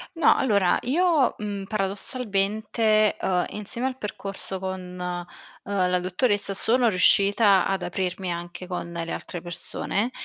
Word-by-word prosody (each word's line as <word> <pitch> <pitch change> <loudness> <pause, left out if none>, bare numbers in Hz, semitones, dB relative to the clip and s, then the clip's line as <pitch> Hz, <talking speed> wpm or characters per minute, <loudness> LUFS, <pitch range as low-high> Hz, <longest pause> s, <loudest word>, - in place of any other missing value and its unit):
No, 330 -3 +5
allora 200 -8 +3
io, 310 0 +3
mhmm, 205 -2 -4
paradossalmente, 215 +1 0
uhm, 180 -2 +1
insieme 220 +4 -4
al 260 -1 -4
percorso 195 -4 -6
con, 190 0 -3 0.2
uhm, 180 +2 -3
la 180 0 +2
dottoressa 200 +3 0
sono 235 +5 +2
riuscita 200 0 +4
ad 195 -1 -1
aprirmi 180 0 -2
anche 175 +1 -6
con 175 -1 -4
le 170 -1 -4
altre 175 - -5
persone 195 +6 -2
195 Hz, 130 wpm, -25 LUFS, 180-220 Hz, 0.2 s, No